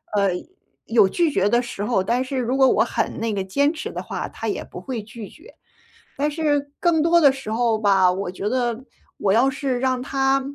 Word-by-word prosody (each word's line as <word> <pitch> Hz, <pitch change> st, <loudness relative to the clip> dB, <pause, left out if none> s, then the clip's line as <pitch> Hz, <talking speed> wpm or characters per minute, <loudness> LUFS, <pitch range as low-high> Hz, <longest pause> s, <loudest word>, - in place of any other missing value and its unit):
呃， 200 Hz, -2 st, +2 dB, 0.5 s
有 220 Hz, -4 st, +4 dB
拒 335 Hz, -, +1 dB
绝 205 Hz, -7 st, +1 dB
的 240 Hz, +2 st, +3 dB
时 220 Hz, -4 st, -6 dB
候， 210 Hz, -4 st, +1 dB
但 240 Hz, +6 st, 0 dB
是 260 Hz, 0 st, -4 dB
如 250 Hz, +1 st, -1 dB
果 270 Hz, -1 st, +5 dB
我 -, -, +3 dB
很 -, -, -2 dB
那 225 Hz, -1 st, -1 dB
个 195 Hz, -1 st, -2 dB
坚 280 Hz, +10 st, +1 dB
持 -, -, -6 dB
的 -, -, -5 dB
话， -, -, -5 dB
他 -, -, -6 dB
也 -, -, -2 dB
不 -, -, -10 dB
会 245 Hz, -6 st, -5 dB
拒 215 Hz, -1 st, -9 dB
绝。 355 Hz, +11 st, -17 dB, 0.6 s
但 295 Hz, +2 st, 0 dB
是 290 Hz, -2 st, -1 dB
更 335 Hz, -3 st, +2 dB
多 340 Hz, +1 st, +4 dB
的 285 Hz, -4 st, +6 dB
时 265 Hz, -5 st, -4 dB
候 230 Hz, -1 st, +1 dB
吧， 195 Hz, -3 st, +4 dB
我 180 Hz, 0 st, -2 dB
觉 195 Hz, +2 st, -4 dB
得 240 Hz, 0 st, -1 dB, 0.4 s
我 195 Hz, -1 st, +1 dB
要 255 Hz, +4 st, +4 dB
是 265 Hz, -2 st, -2 dB
让 255 Hz, -1 st, 0 dB
他 270 Hz, 0 st, +1 dB
245 Hz, 235 characters per minute, -22 LUFS, 210-275 Hz, 0.6 s, 的